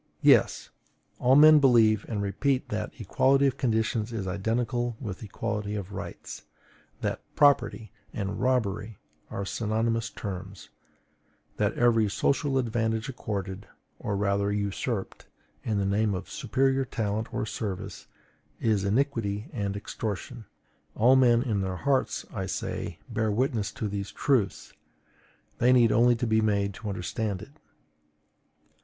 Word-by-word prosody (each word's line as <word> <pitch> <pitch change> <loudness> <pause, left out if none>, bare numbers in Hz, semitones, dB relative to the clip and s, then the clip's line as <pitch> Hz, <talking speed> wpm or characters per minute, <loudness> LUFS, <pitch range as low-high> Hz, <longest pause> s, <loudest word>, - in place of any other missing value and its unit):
Yes: - - +4 0.5
all 130 +2 +4
men 155 +1 +8
believe 115 -6 +4
and 105 -3 -2
repeat 130 +7 0
that - - -3
equality 135 +1 +3
of 135 - +1
conditions 110 -1 0
is 110 -4 -3
identical 115 +5 -1
with 105 -8 -6
equality 105 0 -3
of 100 -1 -5
rights; 100 +1 -7 0.6
that - - -2
PROPERTY 140 - +3 0.2
and 100 0 -4
ROBBERY 110 -5 0 0.3
are 100 - -4
synonymous 115 +2 -1
terms; 95 -1 -7 0.9
that - - +1
every 115 -3 +3
social 140 +6 +1
advantage 115 -1 -1
accorded, 100 -5 -5 0.3
or 100 - -2
rather 100 0 +1
usurped, 100 +1 -3 0.4
in 110 -2 -1
the 100 - 0
name 100 +1 +1
of 90 - -7
superior 135 0 +1
talent 110 -3 -3
or - - -2
service, 100 -3 -5 0.5
is 110 -4 +1
iniquity 105 -2 -1
and 100 -4 -2
extortion. 110 +3 -5 0.5
All 125 +4 +5
men 120 -2 +5
in 110 -7 -1
their 95 -1 -2
hearts, 135 +6 0
I 95 -3 -3
say, - - -4
bear 110 0 -1
witness 110 -1 0
to 110 - -3
these 100 -1 -4
truths; 120 -8 0 0.9
they 125 +2 +4
need 120 -3 +5
only 120 +2 +5
to 120 - -2
be 110 -1 +2
made 100 -2 +1
to 105 - -6
understand 100 +1 -3
it. 140 - -14
110 Hz, 135 wpm, -27 LUFS, 100-120 Hz, 0.9 s, men